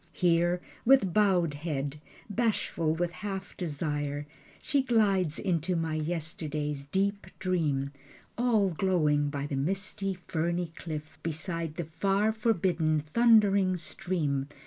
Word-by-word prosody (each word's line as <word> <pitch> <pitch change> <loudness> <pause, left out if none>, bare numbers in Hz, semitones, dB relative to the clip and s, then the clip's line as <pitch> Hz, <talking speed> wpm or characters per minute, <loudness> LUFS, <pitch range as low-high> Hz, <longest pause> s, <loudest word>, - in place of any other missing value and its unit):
Here 175 0 +2 0.2
with 235 -8 +5
bowed 185 -7 +3
head, 145 -1 -3 0.3
bashful 205 -7 0
with 175 +1 -1
half 195 +1 -6
desire 145 -3 -2 0.3
She 280 - +1
glides 200 - +2
into 175 0 0
my 165 -1 -1
yesterday's 155 -2 -2
deep 200 +6 -1
dream, 150 -7 0 0.4
All 230 -5 +3
glowing 155 -5 +2
by 145 -1 -3
the 145 - -3
misty 195 +6 -1
ferny 170 +1 -1
cliff 155 -2 -7
Beside 165 0 -3
the 170 - -3
far 195 +7 +1
forbidden 175 -8 +1
thundering 200 +1 +4
stream. 155 -5 -2
170 Hz, 115 wpm, -29 LUFS, 150-195 Hz, 0.4 s, with